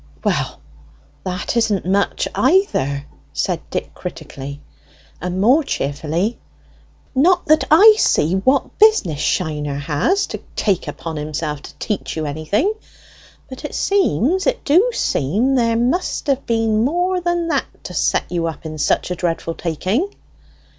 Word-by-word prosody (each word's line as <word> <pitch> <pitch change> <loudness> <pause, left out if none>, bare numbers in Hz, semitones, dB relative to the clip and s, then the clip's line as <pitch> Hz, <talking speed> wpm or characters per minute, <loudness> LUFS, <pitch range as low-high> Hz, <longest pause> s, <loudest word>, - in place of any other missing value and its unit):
"Well, - - -1 0.7
that 185 +5 -3
isn't 220 -6 +1
much, 195 +2 +1
either," 140 - +2 0.3
said 70 0 -1
Dick - - -4
critically, 140 +1 -7 0.6
and 180 +2 -3
more 255 +10 +4
cheerfully. 160 - -2 0.7
"Not 350 +7 +3
that 310 -2 +4
I 410 +8 +8
see 155 +4 +2
what 260 +9 +1
business 415 - +4
Shiner 150 -5 -1
has 155 - +1
to - - -4 0.2
take 195 -5 0
upon 165 -2 -5
himself 150 0 -3
to - - -11
teach 210 -5 -3
you 155 - -2
anything. 155 - 0 0.7
But 260 - -10
it - - -5
seems 375 - +1
it - - -1
do 360 +12 +4
seem 220 - 0
there 230 -3 +2
must 250 +10 0
have 275 -2 0
been 225 -1 +2
more 355 +6 0
than 345 -1 0
that - - +1 0.2
to - - -7
set - - +1
you 170 -2 0
up 160 0 -7
in 155 -1 -6
such 150 - +1
a - - 0
dreadful 165 -1 -2
taking?" 185 - -1
200 Hz, 140 wpm, -19 LUFS, -, 0.7 s, I